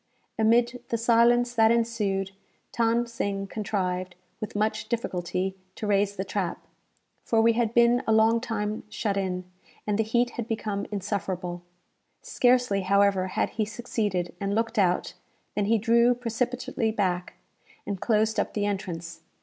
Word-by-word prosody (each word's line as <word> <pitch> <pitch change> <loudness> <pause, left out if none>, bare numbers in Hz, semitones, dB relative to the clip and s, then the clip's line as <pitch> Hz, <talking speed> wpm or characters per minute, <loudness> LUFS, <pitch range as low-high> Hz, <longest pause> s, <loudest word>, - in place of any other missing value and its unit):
Amid 235 +2 +3
the 230 - 0
silence 235 +1 +4
that 225 -2 +5
ensued, 215 -5 0 0.4
Than 235 +1 +2
Sing 200 -4 -3
contrived, 185 -3 -3 0.2
with 215 -2 -6
much 215 +1 -1
difficulty, 190 -4 -2 0.2
to - - -5
raise 200 -1 +2
the 190 0 -3
trap; 190 -2 -3 0.6
for 225 - +1
we 230 +1 +5
had 230 -1 0
been 240 +1 +5
a - - +3
long 220 +1 +4
time 215 -3 -2
shut 210 -2 -2
in, 185 -2 -2 0.4
and 210 0 0
the - - +4
heat 240 +3 +1
had 235 -2 -5
become 215 -3 -3
insufferable. 185 -3 -3 0.6
Scarcely, 245 -5 +2
however, 195 0 +3
had 185 - -1
he 215 - -1
succeeded, 210 -5 -2
and 200 0 -1
looked 225 0 0
out, 180 -2 +1 0.4
than 205 - 0
he 225 +2 +3
drew 235 +2 +4
precipitately 245 0 -2
back, 185 -5 -1 0.5
and 200 -3 -4
closed 220 -1 +2
up - - -2
the 205 -1 0
entrance. 170 -5 -4
215 Hz, 150 wpm, -26 LUFS, 195-230 Hz, 0.6 s, that